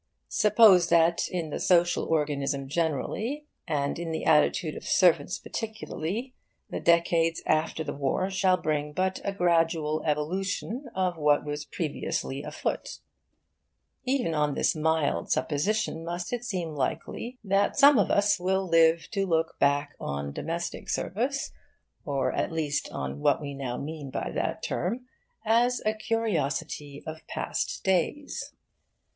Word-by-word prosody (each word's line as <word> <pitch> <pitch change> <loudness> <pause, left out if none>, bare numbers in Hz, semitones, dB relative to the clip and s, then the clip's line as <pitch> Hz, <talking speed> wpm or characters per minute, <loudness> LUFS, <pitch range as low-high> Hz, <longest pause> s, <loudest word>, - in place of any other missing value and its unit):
Suppose 210 -5 +6
that 170 0 +4
in 170 -4 -3
the - - -3
social 175 -1 +3
organism 140 -3 -1
generally, 170 - -2 0.2
and 145 -1 -1
in 170 -1 -4
the 160 - -3
attitude 155 +1 +3
of - - -8
servants 170 -2 +3
particularly, 220 +1 -5 0.4
the - - -3
decades 170 -1 +2
after 155 +1 +1
the - - -4
War 145 +7 -1
shall 190 -1 +3
bring 150 -3 -2
but 190 +3 -1
a 200 - -1
gradual 165 -4 +1
evolution 190 - -2
of 185 -2 0
what 150 -1 +3
was 150 0 -4
previously 145 -3 -3
afoot. - - -4 1.1
Even 255 -10 0
on 150 -2 +1
this - - +2
mild 155 - 0
supposition 165 +2 0
must 175 +5 -4
it 240 -1 -2
seem 180 -8 -3
likely 190 - -3
that 195 0 +1
some 280 -3 +7
of 200 - +2
us 200 -1 +3
will 190 +1 0
live 165 -1 +4
to 195 -1 0
look 160 -2 0
back 145 +1 +2
on 70 0 -4
domestic 170 - -4
service, 260 +8 -1 0.5
or 140 -2 0
at - - -1
least 150 -3 -1
on 70 +1 -5
what - - +3
we 145 -2 -5
now 130 -3 -4
mean 150 -1 -6
by - - -3
that - - -2
term, 235 +8 -2 0.4
as 240 +3 +3
a 215 - +2
curiosity 160 -10 -2
of 160 0 -7
past - - -3
days. 190 - -1
165 Hz, 140 wpm, -27 LUFS, 150-195 Hz, 1.1 s, some